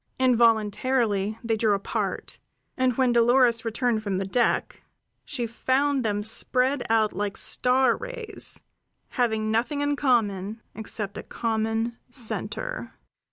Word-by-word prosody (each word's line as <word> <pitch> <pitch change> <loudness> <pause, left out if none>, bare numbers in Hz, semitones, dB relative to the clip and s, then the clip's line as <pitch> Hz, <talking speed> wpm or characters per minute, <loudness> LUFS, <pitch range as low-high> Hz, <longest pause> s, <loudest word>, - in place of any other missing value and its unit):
Involuntarily 225 -3 +2
they 230 -1 0
drew 215 -2 +2
apart; 200 - -4 0.4
and 255 -3 +1
when 255 -2 +3
Dolores 235 0 +4
returned 230 0 0
from 200 -3 -2
the 195 - -2
deck 235 +5 0 0.4
she 250 -5 -3
found 260 +4 0
them 210 -2 -1
spread 255 +5 +2
out 220 -1 +2
like 200 0 -3
star 255 0 +3
rays, 485 -4 -2 0.5
having 220 -4 0
nothing 245 +6 0
in 290 0 +1
common 220 -6 0
except 210 -2 -4
a - - -5
common 225 +1 -2
center. 270 - -4
235 Hz, 120 wpm, -25 LUFS, 215-255 Hz, 0.5 s, Dolores